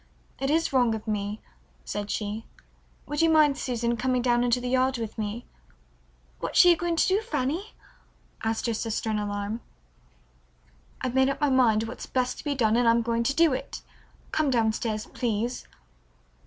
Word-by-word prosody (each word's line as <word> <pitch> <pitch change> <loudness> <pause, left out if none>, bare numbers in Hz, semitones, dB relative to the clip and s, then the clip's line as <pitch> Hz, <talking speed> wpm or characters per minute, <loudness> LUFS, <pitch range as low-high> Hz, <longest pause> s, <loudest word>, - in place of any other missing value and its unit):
It 270 - -1
is 325 0 +1
wrong 245 -4 +3
of 220 +1 -8
me," 210 0 -2 0.4
said 205 0 -4
she. 210 +1 -3 0.6
"Would 295 +1 -2
you 330 - +4
mind, 305 -3 +5
Susan, 240 -3 -1
coming 255 0 0
down 240 -1 +3
into 245 0 +2
the 250 - -4
yard 260 0 +2
with 225 -2 -5
me?" 220 +2 -4 0.9
"What - - +4
are - - +8
you 345 - +7
going 340 0 -1
to - - +3
do, 385 +3 +2
Fanny?" 380 - -3 0.7
asked 225 0 -1
her 230 - 0
sister 225 0 -2
in 210 - 0
alarm. 205 +2 -3 1.4
"I've 255 -2 -2
made 265 +1 +4
up 275 - -2
my 290 -2 +2
mind 230 -4 +4
what's 225 +2 -7
best 255 -1 -1
to - - -8
be 290 -2 -1
done, 225 -4 +2
and 240 -1 +4
I'm 230 0 +3
going 230 0 0
to 275 +4 0
do 330 -3 +4
it. 260 - -5 0.5
Come 310 -2 +1
down 225 -4 +2
stairs, 215 -1 -3
please." 235 +1 -3
245 Hz, 180 wpm, -26 LUFS, 220-270 Hz, 1.4 s, are